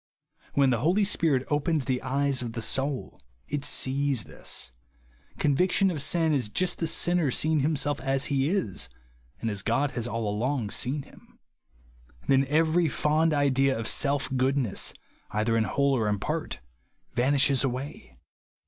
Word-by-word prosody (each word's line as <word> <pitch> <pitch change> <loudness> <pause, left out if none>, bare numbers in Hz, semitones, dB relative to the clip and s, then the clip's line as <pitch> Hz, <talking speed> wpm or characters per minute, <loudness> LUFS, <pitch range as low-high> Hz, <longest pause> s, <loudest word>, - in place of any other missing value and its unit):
When 140 -2 +4
the 120 - +1
Holy 175 - +2
Spirit 160 -9 +1
opens 145 -1 +1
the 130 -2 -1
eyes 140 -1 0
of 120 -2 -5
the 115 - -4
soul 135 +2 -2 0.3
it 145 -1 -3
sees 135 -4 +1
this. 65 - -4 0.7
Conviction 180 +6 +2
of 155 -5 -3
sin 160 +2 +1
is 125 -7 0
just 185 +11 0
the 165 - 0
sinner 170 -1 +2
seeing 155 +4 +2
himself 145 0 0
as 135 0 0
he 140 0 +1
is, 185 - -1 0.5
and 115 - -1
as 100 -1 -1
God 135 +5 0
has 120 -1 -3
all 115 -1 -3
along 110 +1 -1
seen 140 +3 -1
him. - - -20 0.9
Then 135 0 +3
every 160 +3 +2
fond 155 +3 +1
idea 135 -2 +2
of 115 -1 -3
self 140 -2 0
goodness, 130 -4 0 0.3
either 110 +2 0
in 110 -1 +2
whole 140 +2 +1
or 110 -4 0
in 105 - 0
part, - - -4 0.5
vanishes 135 +1 +3
away. 125 - -5
140 Hz, 155 wpm, -27 LUFS, 125-150 Hz, 0.9 s, When